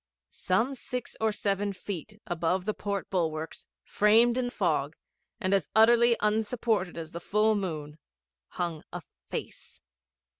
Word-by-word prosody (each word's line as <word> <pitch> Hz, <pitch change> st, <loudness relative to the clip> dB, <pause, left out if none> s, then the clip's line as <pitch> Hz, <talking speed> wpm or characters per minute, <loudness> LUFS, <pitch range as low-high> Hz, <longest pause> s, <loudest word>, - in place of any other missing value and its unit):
Some 225 Hz, +9 st, 0 dB
six 250 Hz, -1 st, -6 dB
or 220 Hz, 0 st, +3 dB
seven 200 Hz, -1 st, -1 dB
feet 200 Hz, +2 st, -7 dB
above 175 Hz, +2 st, 0 dB
the 215 Hz, -, 0 dB
port 200 Hz, -2 st, -4 dB
bulwarks, 160 Hz, -3 st, -2 dB, 0.2 s
framed 225 Hz, +3 st, +4 dB
in 250 Hz, -1 st, 0 dB
fog, 160 Hz, -, 0 dB, 0.4 s
and 185 Hz, +1 st, 0 dB
as 195 Hz, -, +1 dB
utterly 235 Hz, +1 st, +6 dB
unsupported 210 Hz, -3 st, 0 dB
as 160 Hz, -1 st, -6 dB
the 170 Hz, -, -6 dB
full 210 Hz, +4 st, +2 dB
moon, 160 Hz, -7 st, -4 dB, 0.5 s
hung 170 Hz, -3 st, -4 dB
a 175 Hz, -1 st, -6 dB, 0.3 s
Face. -, -, -7 dB
200 Hz, 135 wpm, -29 LUFS, 175-220 Hz, 0.5 s, utterly